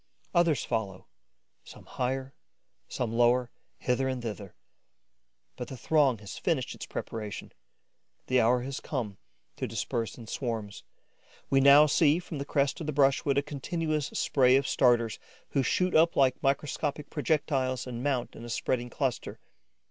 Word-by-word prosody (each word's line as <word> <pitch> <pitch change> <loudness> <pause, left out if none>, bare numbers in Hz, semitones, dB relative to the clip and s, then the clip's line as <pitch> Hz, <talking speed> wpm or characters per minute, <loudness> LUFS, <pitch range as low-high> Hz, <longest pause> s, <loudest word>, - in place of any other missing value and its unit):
Others 170 -6 +2
follow, 100 -5 -3 0.6
some - - -14
higher, 130 +1 -3 0.5
some 115 -3 -3
lower, 120 +1 +3 0.3
hither 130 +1 0
and 130 -1 -2
thither. 105 -4 -6 1.0
But 125 - -6
the 130 - -8
throng 140 -2 +2
has 105 -1 -9
finished 145 -8 -1
its - - -8
preparations; 105 -2 -6 0.7
the 130 0 +3
hour 120 +2 +3
has 135 +1 -4
come 110 -9 -4 0.4
to - - -2
disperse 115 +1 -3
in 120 - -10
swarms. 110 - -4 0.7
We 135 - +5
now 140 +2 +8
see, 150 +1 +4
from 170 -4 -6
the 140 - -4
crest 140 +1 0
of 160 - -5
the - - 0
brushwood, 140 0 +2
a 140 - +3
continuous 155 +1 -2
spray 130 -3 +3
of 135 0 +2
starters, 120 -3 +2 0.3
who 140 - +1
shoot 180 +7 +1
up 165 +1 +4
like 130 -2 +3
microscopic 145 +1 -1
projectiles 135 -3 0
and 120 -2 -6
mount 135 -3 -1
in 115 - -10
a 120 - -8
spreading 120 +1 -1
cluster. 130 0 -3
130 Hz, 150 wpm, -29 LUFS, 120-145 Hz, 1.0 s, now